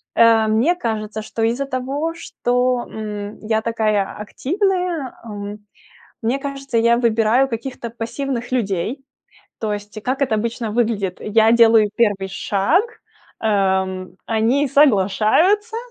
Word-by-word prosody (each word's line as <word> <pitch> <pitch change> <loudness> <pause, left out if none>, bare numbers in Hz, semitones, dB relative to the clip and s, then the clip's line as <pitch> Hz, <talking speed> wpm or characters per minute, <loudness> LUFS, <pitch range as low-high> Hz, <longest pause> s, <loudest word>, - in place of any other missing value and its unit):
А, 225 -1 +5
мне 230 +11 +2
кажется, 220 -6 -3
что 225 +1 -4
из-за 245 +5 0
того, 275 +5 -2
что, 250 -5 -1
м, 210 -1 -6
я 220 0 +1
такая 215 -3 0
активная, 350 - -1
м, 205 -1 -8 0.5
мне 240 +5 0
кажется, 275 -3 -4
я 235 +1 +4
выбираю 235 +2 +2
каких-то 235 0 -5
пассивных 240 +2 -4
людей. 225 +4 -1 0.6
То 215 -2 -1
есть 205 +1 -7
как 260 +4 -2
это 255 -5 +1
обычно 230 +1 -2
выглядит? 215 -5 0
Я 220 +1 +3
делаю 225 -2 +6
первый 205 -4 +1
шаг, 205 - +1 0.5
ам, 190 -3 0 0.2
они 235 +6 +1
соглашаются, 285 - +3
230 Hz, 120 wpm, -20 LUFS, 210-265 Hz, 0.6 s, делаю